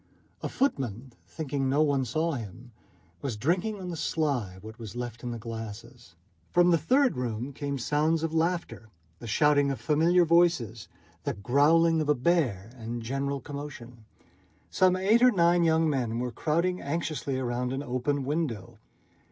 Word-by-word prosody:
A - - -3
footman, 130 - -2
thinking 140 -4 -2
no 145 +3 +3
one 140 -3 +1
saw 160 +8 0
him, 120 - -7 0.5
was 130 -6 -3
drinking 185 - 0
on 180 -1 -5
the - - -4
sly 140 - -1
what 110 +1 -10
was 110 -2 -8
left 120 -1 -5
in 125 - -4
the 120 - -4
glasses. 115 -2 -8 0.3
From 175 0 +4
the 170 - +5
third 255 - +2
room 125 +2 -3
came 140 0 -3
sounds 155 +5 +1
of 165 -1 -2
laughter, 165 -8 -1 0.3
the 120 - -8
shouting 145 +4 +3
of 135 - -3
familiar 170 +3 +3
voices, 165 -10 +2 0.4
the - - -2
growling 155 +9 +3
of 150 - -2
a 150 - +4
bear, 125 - 0
and 115 +1 -5
general 135 +3 -2
commotion. 130 -4 -9 0.7
Some 185 -1 +4
eight 200 +5 +3
or 250 - +8
nine 175 -4 +3
young 160 0 +3
men 125 -6 -1
were 125 0 -2
crowding 170 +8 0
anxiously 145 -3 -2
round 125 0 -2
an 135 +2 -3
open 130 +2 -1
window. 145 - -3
140 Hz, 160 wpm, -28 LUFS, 120-165 Hz, 0.7 s, or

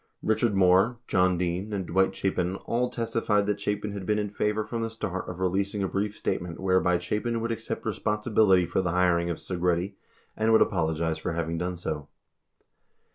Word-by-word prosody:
Richard 110 -1 +2
Moore, 95 +5 +4
John 90 -1 +3
Dean, 90 +4 -2
and 95 -2 -2
Dwight 95 +2 +2
Chapin 95 -1 -1
all 125 +1 0
testified 115 -3 0
that 105 0 -1
Chapin 105 0 -2
had 100 -1 -5
been 105 +2 +1
in 105 -1 -2
favor 105 +1 0
from 115 +1 -4
the 115 - -1
start 95 -5 -4
of 90 0 -7
releasing 100 +2 0
a - - +1
brief 100 +2 -2
state - - -1
ment 85 -2 -7
whereby 95 -1 +3
Chapin 105 +7 -2
would 115 +1 -2
accept 115 - -4
responsibility 105 -3 +2
for 90 +3 0
the 90 - -1
hiring 90 -1 +2
of 85 - -2
Segretti 90 +1 -1 0.4
and 110 +1 +2
would 110 - +6
apologize 80 -3 -1
for 90 - -3
having 85 0 -2
done 90 +1 -2
so. 75 -4 -4
95 Hz, 185 wpm, -27 LUFS, 90-105 Hz, 0.4 s, would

